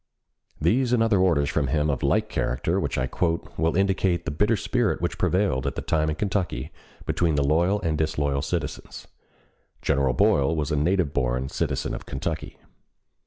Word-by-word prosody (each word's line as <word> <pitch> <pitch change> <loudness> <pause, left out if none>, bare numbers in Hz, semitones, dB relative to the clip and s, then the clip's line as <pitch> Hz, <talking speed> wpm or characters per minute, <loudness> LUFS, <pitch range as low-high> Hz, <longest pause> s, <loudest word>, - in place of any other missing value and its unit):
These 120 - +2
and 115 -2 +4
other 110 -4 +3
orders 85 -6 +3
from 75 -1 0
him 75 +2 +1
of 70 - -3
like - - +2
character 65 - -1
which - - -2
I 65 - +1
quote 85 +5 -2
will 80 +2 0
indicate 95 -2 +1
the 80 - -2
bitter 105 +9 +2
spirit 110 +1 0
which - - -3
prevailed 85 -9 +1
at 70 - -3
that - - -5
time 80 -1 +1
in 75 - -1
Kentucky 95 -9 -2 0.3
between 85 -3 +1
the 70 - +2
loyal 85 +8 +2
and 80 -3 -1
disloyal 70 -3 0
citizens. - - -5 0.8
General 70 -2 +2
Boyle 70 +6 +3
was 75 0 -2
a - - +1
native 80 0 +1
born 65 0 0
citizen - - -2
of - - -7
Kentucky. - - -4
80 Hz, 175 wpm, -25 LUFS, 70-95 Hz, 0.8 s, and